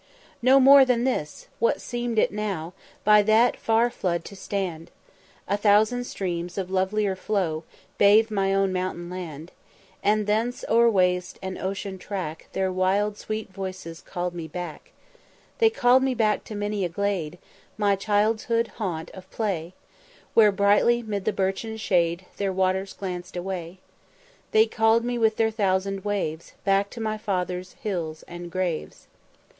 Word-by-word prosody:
"No 260 Hz, +3 st, +6 dB
more 275 Hz, +1 st, +8 dB
than 250 Hz, -2 st, +1 dB
this! 155 Hz, -, -2 dB
what 230 Hz, -, +2 dB
seem'd 240 Hz, -2 st, -3 dB
it -, -, +3 dB
now 195 Hz, -5 st, -3 dB, 0.3 s
By 210 Hz, 0 st, +6 dB
that 220 Hz, +4 st, +4 dB
far 230 Hz, +2 st, +2 dB
flood 170 Hz, -5 st, -2 dB
to 200 Hz, -, -9 dB
stand? 190 Hz, -4 st, -4 dB, 0.6 s
A 200 Hz, -, +1 dB
thousand 215 Hz, +4 st, +3 dB
streams 175 Hz, -4 st, -4 dB
of 190 Hz, -1 st, -3 dB
lovelier 190 Hz, +1 st, +1 dB
flow 180 Hz, -5 st, -2 dB, 0.3 s
Bathe 215 Hz, +2 st, +5 dB
my 195 Hz, -2 st, +1 dB
own 195 Hz, -1 st, +2 dB
mountain 180 Hz, -1 st, -3 dB
land, 170 Hz, -3 st, -7 dB, 0.5 s
And 210 Hz, 0 st, +2 dB
thence 225 Hz, +4 st, -1 dB
o'er 235 Hz, +1 st, +5 dB
waste 180 Hz, -3 st, +1 dB
and 190 Hz, 0 st, -4 dB
ocean 195 Hz, 0 st, -4 dB
track 180 Hz, -6 st, -5 dB
Their 190 Hz, -1 st, 0 dB
wild 195 Hz, +3 st, +1 dB
sweet 215 Hz, -1 st, -5 dB
voices 185 Hz, -4 st, -6 dB
call'd 175 Hz, 0 st, -4 dB
me 170 Hz, -2 st, -6 dB
back. 170 Hz, -1 st, -7 dB, 0.7 s
They 450 Hz, -2 st, +6 dB
call'd 255 Hz, -, +4 dB
me 265 Hz, -1 st, +1 dB
back 215 Hz, -3 st, +1 dB
to 215 Hz, -, -7 dB
many 205 Hz, -1 st, -2 dB
a 175 Hz, -, -1 dB
glade, 180 Hz, -3 st, -2 dB, 0.4 s
My 205 Hz, -2 st, +3 dB
childhood's 220 Hz, +3 st, +1 dB
haunt 175 Hz, -7 st, -4 dB
of 190 Hz, 0 st, -12 dB
play, 185 Hz, -5 st, -3 dB, 0.6 s
Where 215 Hz, -2 st, +6 dB
brightly 205 Hz, +4 st, +3 dB
'mid 205 Hz, -3 st, -4 dB
the -, -, +2 dB
birchen 195 Hz, +3 st, -2 dB
shade 180 Hz, -4 st, +1 dB
Their 200 Hz, -1 st, 0 dB
waters 190 Hz, +1 st, 0 dB
glanced 180 Hz, -1 st, -6 dB
away: 175 Hz, -1 st, -5 dB, 0.7 s
They 220 Hz, 0 st, +5 dB
call'd 225 Hz, +1 st, +2 dB
me 245 Hz, 0 st, -1 dB
with 220 Hz, -1 st, +3 dB
their 220 Hz, 0 st, +2 dB
thousand 195 Hz, -2 st, 0 dB
waves 185 Hz, -6 st, -3 dB
Back 195 Hz, 0 st, +2 dB
to 235 Hz, -, -9 dB
my 215 Hz, -1 st, -2 dB
fathers' 185 Hz, -3 st, -3 dB
hills 170 Hz, -7 st, -3 dB
and 175 Hz, 0 st, -8 dB
graves." 180 Hz, -3 st, -3 dB
195 Hz, 155 wpm, -25 LUFS, 180-220 Hz, 0.7 s, more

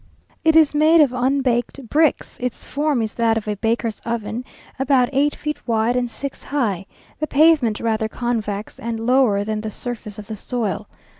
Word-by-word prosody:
It 320 Hz, 0 st, +4 dB
is 315 Hz, -3 st, +6 dB
made 310 Hz, +3 st, +5 dB
of 285 Hz, -5 st, +5 dB
unbaked 255 Hz, 0 st, 0 dB
bricks; 310 Hz, +4 st, +1 dB
its 250 Hz, -1 st, -3 dB
form 290 Hz, -4 st, 0 dB
is 220 Hz, -, -4 dB
that 230 Hz, -1 st, +2 dB
of 220 Hz, -, -4 dB
a 210 Hz, -, -1 dB
baker's 225 Hz, +1 st, -1 dB
oven, 230 Hz, 0 st, -3 dB, 0.4 s
about 265 Hz, -2 st, +3 dB
eight 285 Hz, +2 st, +2 dB
feet 300 Hz, -2 st, -5 dB
wide 230 Hz, +1 st, +1 dB
and 250 Hz, -1 st, 0 dB
six 275 Hz, +4 st, -7 dB
high; 210 Hz, -10 st, -1 dB, 0.3 s
the 305 Hz, -, -1 dB
pavement 285 Hz, -8 st, +4 dB
rather 220 Hz, -1 st, 0 dB
convex, 220 Hz, -3 st, -3 dB
and 230 Hz, -1 st, -3 dB
lower 230 Hz, -4 st, +3 dB
than 215 Hz, 0 st, -2 dB
the 220 Hz, -, -4 dB
surface 220 Hz, -2 st, -6 dB
of 210 Hz, -, -8 dB
the 220 Hz, -, -6 dB
soil. 215 Hz, -2 st, -3 dB
240 Hz, 175 wpm, -21 LUFS, 220-275 Hz, 0.4 s, is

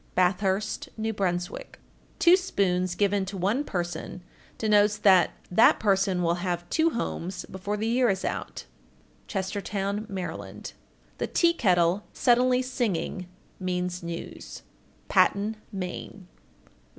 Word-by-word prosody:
Bathurst, 190 Hz, +3 st, +1 dB
N.B. 220 Hz, 0 st, -1 dB
1462. 180 Hz, -4 st, -3 dB, 0.4 s
Two 345 Hz, +1 st, +7 dB
spoons 185 Hz, -, 0 dB
given 200 Hz, 0 st, +1 dB
to 195 Hz, +1 st, -6 dB
one 205 Hz, +10 st, +1 dB
person 175 Hz, -, -4 dB, 0.3 s
denotes 210 Hz, -1 st, +3 dB
that 190 Hz, -4 st, +5 dB, 0.2 s
that 200 Hz, +5 st, +5 dB
person 195 Hz, -3 st, +2 dB
will 170 Hz, +1 st, 0 dB
have 175 Hz, -2 st, -2 dB
two 325 Hz, +1 st, +3 dB
homes 185 Hz, -, -4 dB
before 195 Hz, +2 st, -4 dB
the 215 Hz, -, -2 dB
year 240 Hz, +1 st, +3 dB
is 190 Hz, -1 st, -1 dB
out. -, -, -4 dB, 0.6 s
Chestertown, 200 Hz, +1 st, -3 dB
Md. -, -, -25 dB, 0.2 s
1463. -, -, -9 dB, 0.5 s
The -, -, -1 dB
tea 340 Hz, -1 st, +3 dB
kettle 180 Hz, -, +2 dB
suddenly 250 Hz, +1 st, +3 dB
singing 205 Hz, -7 st, -2 dB, 0.3 s
means 180 Hz, -1 st, -2 dB
news. 170 Hz, 0 st, -7 dB, 0.4 s
_Patten, 205 Hz, +2 st, +3 dB, 0.2 s
Me. 190 Hz, 0 st, -6 dB
195 Hz, 120 wpm, -27 LUFS, 180-215 Hz, 0.6 s, Two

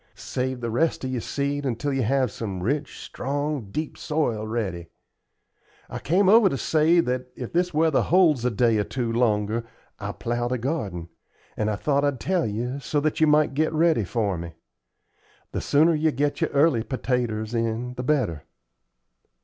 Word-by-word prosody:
Save 130 Hz, 0 st, -3 dB
the 120 Hz, -1 st, -2 dB
rest 155 Hz, +7 st, 0 dB
of 130 Hz, -, -2 dB
your 125 Hz, -2 st, -2 dB
seed 140 Hz, +3 st, -2 dB
until 135 Hz, +2 st, -2 dB
you 135 Hz, -, 0 dB
have 130 Hz, 0 st, +1 dB
some 95 Hz, -5 st, -5 dB
rich, 140 Hz, +6 st, -2 dB
strong, 145 Hz, -4 st, -3 dB
deep 155 Hz, +8 st, -4 dB
soil 120 Hz, -9 st, -1 dB
ready. 95 Hz, -7 st, -3 dB, 1.0 s
I -, -, -4 dB
came 185 Hz, +6 st, +2 dB
over 215 Hz, 0 st, +7 dB
to 135 Hz, -, -2 dB
say 160 Hz, +5 st, +3 dB
that 125 Hz, -3 st, -2 dB
if 125 Hz, -, -7 dB
this 175 Hz, +1 st, +1 dB
weather 160 Hz, -2 st, +3 dB
holds 165 Hz, -8 st, +3 dB
a 125 Hz, -, +2 dB
day 115 Hz, -1 st, +2 dB
or -, -, +2 dB
two 120 Hz, +1 st, -3 dB
longer 110 Hz, -1 st, +1 dB, 0.4 s
I'll -, -, -4 dB
plow 120 Hz, +1 st, -2 dB
the 125 Hz, +1 st, -1 dB
garden; 105 Hz, -, -3 dB, 0.5 s
and 105 Hz, 0 st, -1 dB
I 105 Hz, -, 0 dB
thought 140 Hz, +6 st, 0 dB
I'd 140 Hz, -3 st, 0 dB
tell 180 Hz, -1 st, 0 dB
you, 120 Hz, +6 st, -3 dB
so 145 Hz, +1 st, -1 dB
that 155 Hz, +2 st, -1 dB
you 155 Hz, -, +6 dB
might 150 Hz, -1 st, +3 dB
get 155 Hz, +3 st, +1 dB
ready 160 Hz, -6 st, +3 dB
for 100 Hz, -1 st, -1 dB
me. 85 Hz, -1 st, -7 dB, 1.0 s
The -, -, -3 dB
sooner 155 Hz, +4 st, +4 dB
you 155 Hz, 0 st, +2 dB
get 145 Hz, +1 st, -1 dB
your -, -, +2 dB
early 140 Hz, -4 st, +3 dB
pertaters 120 Hz, -3 st, -2 dB
in 115 Hz, +1 st, -1 dB
the 125 Hz, -, -5 dB
better." 125 Hz, -, 0 dB
130 Hz, 180 wpm, -25 LUFS, 115-150 Hz, 1.0 s, over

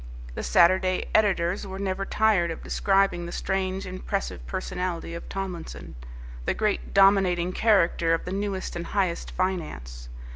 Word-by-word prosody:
The -, -, -4 dB
Saturday 185 Hz, -, +3 dB
editors 195 Hz, -2 st, +2 dB
were 190 Hz, 0 st, -6 dB
never 195 Hz, 0 st, -2 dB
tired 205 Hz, -5 st, +2 dB
of 165 Hz, -, -6 dB
describing 195 Hz, -3 st, +1 dB
the -, -, -6 dB
strange, 190 Hz, 0 st, -2 dB
impressive 185 Hz, +2 st, -4 dB
personality 180 Hz, -3 st, -3 dB
of 170 Hz, -, -7 dB
Tomlinson, 185 Hz, -4 st, -6 dB, 0.5 s
the -, -, 0 dB
great 215 Hz, -2 st, -1 dB
dominating 190 Hz, -3 st, +4 dB
character 175 Hz, -6 st, +3 dB
of -, -, -6 dB
the 180 Hz, -, -4 dB
newest 195 Hz, -2 st, -3 dB
and 170 Hz, 0 st, -4 dB
highest 185 Hz, -4 st, -1 dB
finance. 60 Hz, -, -4 dB
185 Hz, 140 wpm, -26 LUFS, 170-195 Hz, 0.5 s, dominating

